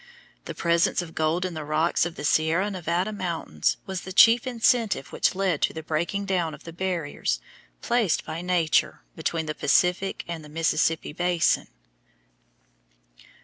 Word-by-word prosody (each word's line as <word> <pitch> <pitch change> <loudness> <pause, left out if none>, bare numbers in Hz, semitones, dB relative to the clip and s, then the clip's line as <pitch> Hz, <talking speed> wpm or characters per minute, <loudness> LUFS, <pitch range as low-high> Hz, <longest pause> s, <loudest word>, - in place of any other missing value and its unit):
The - - -6
presence 170 +1 +2
of 165 -1 -11
gold 160 +3 0
in 180 - -4
the 155 -1 -5
rocks 155 +3 +1
of 170 - -9
the - - -7
Sierra 160 +6 +2
Nevada 180 +2 -1
mountains 170 - -2
was 190 -2 -4
the 190 - -8
chief 230 +6 +6
incentive 230 - +1
which - - +1
led 185 -5 0
to - - +1
the 160 - -7
breaking 170 +6 -2
down 175 -5 -1
of 150 - -17
the 165 - -9
barriers 165 - -2 0.4
placed 230 -8 +1
by 160 +2 -5
Nature 175 -3 +1
between 165 -1 -2
the 155 - -3
Pacific 180 +6 +1
and 170 -2 -5
the 150 - -12
Mississippi 160 0 0
basin. 175 0 +1
170 Hz, 155 wpm, -25 LUFS, 160-185 Hz, 0.4 s, chief